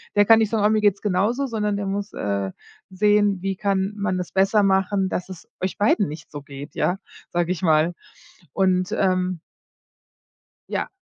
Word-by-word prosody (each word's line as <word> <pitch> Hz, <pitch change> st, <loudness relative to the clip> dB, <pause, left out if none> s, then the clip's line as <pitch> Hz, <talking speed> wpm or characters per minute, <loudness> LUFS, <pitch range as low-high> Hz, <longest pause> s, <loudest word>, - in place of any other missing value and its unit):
der 205 Hz, 0 st, +5 dB
kann 225 Hz, +1 st, +7 dB
nicht 220 Hz, -2 st, +2 dB
sagen: 220 Hz, -3 st, +1 dB
„Oh, -, -, +5 dB
mir 215 Hz, 0 st, +2 dB
geht's 205 Hz, -1 st, +2 dB
genauso“, 210 Hz, +7 st, +1 dB
sondern 210 Hz, -5 st, -1 dB
der 200 Hz, -, -3 dB
muss, 200 Hz, +1 st, -3 dB
äh, 100 Hz, -1 st, -2 dB, 0.4 s
sehen, 205 Hz, 0 st, +2 dB
wie 195 Hz, 0 st, -1 dB
kann 195 Hz, +1 st, 0 dB
man 200 Hz, -2 st, -1 dB
das 180 Hz, -1 st, -5 dB
besser 195 Hz, +2 st, +3 dB
machen, 195 Hz, 0 st, +2 dB
dass 180 Hz, -, -3 dB
es 185 Hz, -3 st, -10 dB, 0.2 s
euch 185 Hz, -, -2 dB
beiden 205 Hz, -1 st, +3 dB
nicht 155 Hz, +2 st, -9 dB
so 145 Hz, -, -7 dB
geht, 140 Hz, +1 st, -10 dB
ja? 180 Hz, -, +1 dB, 0.3 s
Sag 175 Hz, 0 st, -1 dB
ich 180 Hz, -3 st, -2 dB
mal. 160 Hz, 0 st, +3 dB, 0.6 s
Und, 185 Hz, -1 st, +1 dB
ähm 185 Hz, -2 st, 0 dB, 1.3 s
Ja, -, -, -2 dB
195 Hz, 180 wpm, -23 LUFS, 180-205 Hz, 1.3 s, kann